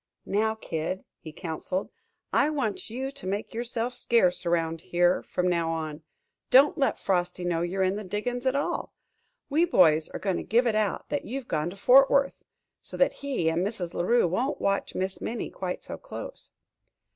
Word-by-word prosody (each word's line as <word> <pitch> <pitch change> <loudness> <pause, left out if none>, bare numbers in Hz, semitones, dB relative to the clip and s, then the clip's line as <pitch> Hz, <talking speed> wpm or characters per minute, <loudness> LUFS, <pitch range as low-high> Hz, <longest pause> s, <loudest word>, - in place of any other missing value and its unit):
"Now, 220 +2 +1
Kid," 170 -2 -4 0.2
he 155 - -9
counseled, 170 +3 -4 0.4
"I 285 - +4
want 250 -11 -2
you 260 +4 -4
to 185 - -9
make 200 +3 -3
yourself 235 +1 -2
scarce 190 -7 +2
around 165 -1 0
here 175 +1 +2
from 180 - -2
now 170 -2 +1
on. 160 -1 -3 0.5
Don't 275 +3 +6
let 275 - +1
Frosty 180 -1 -1
know 170 -2 0
you're 185 +3 0
in 190 +2 +1
the 210 - -5
diggin's 245 +6 -3
at 260 - +2
all. 285 - -2 0.5
We 305 +4 +2
boys 160 - +4
are - - -5
going 190 -3 -1
to - - -4
give 240 +3 +2
it 230 - +2
out 215 -3 -1
that 145 - -2
you've 260 +1 -5
gone 155 +1 -1
to 180 - -9
Fort 265 +7 +6
Worth, 275 0 +1 0.4
so - - -7
that - - +3
he 275 -12 -1
and 165 +2 +1
Mrs. 190 -4 -3
La - - -1
Rue 235 +2 +3
won't 240 - -1
watch 200 0 -1
Miss 190 +1 -2
Minnie 230 0 -4
quite 180 -1 -4
so - - -7
close." - - -9
195 Hz, 190 wpm, -27 LUFS, 175-245 Hz, 0.5 s, Don't